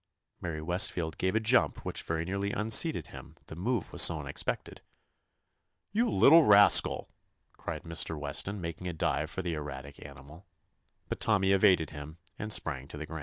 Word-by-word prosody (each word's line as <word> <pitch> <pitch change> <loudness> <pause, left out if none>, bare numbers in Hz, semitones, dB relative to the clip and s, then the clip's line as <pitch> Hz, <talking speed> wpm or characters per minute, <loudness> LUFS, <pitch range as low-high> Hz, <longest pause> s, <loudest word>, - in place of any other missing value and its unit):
Mary 80 -2 -6
Westfield 85 -1 0
gave 95 +3 -1
a - - +2
jump 110 - 0
which - - -4
very 80 0 -4
nearly 100 +2 -3
unseated 110 +11 +2
him, - - -13
the - - -11
move 110 +4 -4
was - - +4
so - - +5
unexpected. - - -5 1.1
"You 230 +4 0
little 165 -2 +5
rascal!" 105 -4 +5 0.5
cried 80 0 -7
Mr. 85 -1 -2
Weston, 75 +8 -4
making 85 +1 -7
a 90 - -4
dive 80 -1 -2
for 95 - -6
the 85 -1 -3
erratic 70 -2 -9
animal. 70 +6 -14 0.6
But - - -6
Tommy 95 -3 +1
evaded 95 -5 +2
him, 75 +1 -10 0.2
and 110 +1 -5
sprang 70 -9 -1
to 75 - -11
the 80 - -7
ground. 80 +1 -8
85 Hz, 170 wpm, -28 LUFS, 75-100 Hz, 1.1 s, so